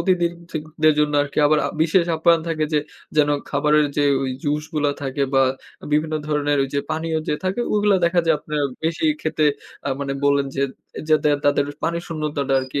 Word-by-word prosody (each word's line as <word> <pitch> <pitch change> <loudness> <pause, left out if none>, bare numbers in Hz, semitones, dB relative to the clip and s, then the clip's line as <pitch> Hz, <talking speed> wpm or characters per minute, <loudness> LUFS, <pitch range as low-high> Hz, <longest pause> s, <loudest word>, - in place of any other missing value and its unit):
অতিথি 180 -3 +2 0.2
থি 160 - -2 0.2
দের 155 0 +6
জন্য 150 0 +2
আরকি 145 +1 -5
আবার 155 +1 +3
আ - - -1
বিশেষ 170 +2 +3
আপ্যায়ন 165 +1 +4
থাকে 155 -2 0
যে 150 - +3 0.4
যেন 150 -1 +4 0.2
খাবারের 150 0 +3
যে 145 - +3 0.2
ওই 130 - -1
জুসগুলা 150 0 -1
থাকে 135 +1 -2
বা 135 - +5 0.5
বিভিন্ন 155 +1 +1
ধরনের 145 -1 +1
ওইযে 140 +1 -2
পানীয় 160 +1 -1
যে - - +2
থাকে, 185 +5 -1
ওইগুলা 205 -1 +3
দেখা 170 +1 +3
যায় 165 - +4
আপনারা 150 -1 -2 0.2
বেশি 165 - -1 0.2
খেতে 155 - 0 0.4
আ - - 0
মানে 140 -1 -2
বললেন 140 -1 +3
যে, 140 - +1 0.5
যাতে 155 -1 +3 0.2
তাদের 145 0 +3 0.2
পানি 170 0 0
শূন্যতাটা 150 -4 -2
আরকি 130 +2 -4
150 Hz, 185 wpm, -21 LUFS, 145-160 Hz, 0.5 s, দের